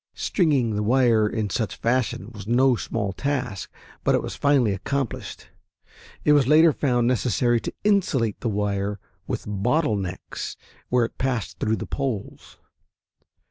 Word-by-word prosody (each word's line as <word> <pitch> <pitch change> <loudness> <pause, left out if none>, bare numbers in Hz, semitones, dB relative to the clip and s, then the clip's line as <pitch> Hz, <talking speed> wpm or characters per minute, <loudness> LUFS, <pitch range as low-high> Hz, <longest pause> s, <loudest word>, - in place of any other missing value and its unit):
Stringing 140 - +1
the 105 - 0
wire 115 -1 +3
in 105 -3 -2
such 110 0 -1
fashion 115 -4 -1
was 100 -2 -9
no 125 +2 +4
small 105 -3 -3
task, 125 -6 -3 0.3
but - - +3
it - - 0
was - - -5
finally 135 -7 +3
accomplished. 120 +4 -4 0.8
It 150 - +6
was 140 -4 +4
later 155 +2 +6
found 125 -5 +1
necessary 120 -1 +2
to - - -5
insulate 170 - +1
the 120 - -2
wire 100 -1 -1 0.3
with - - -3
bottle 110 +6 +1
necks 90 -2 -5 0.3
where 125 -1 +3
it - - -10
passed 130 -4 -2
through 110 +1 +1
the - - -5
poles. 130 -8 -5
120 Hz, 145 wpm, -24 LUFS, 105-135 Hz, 0.8 s, It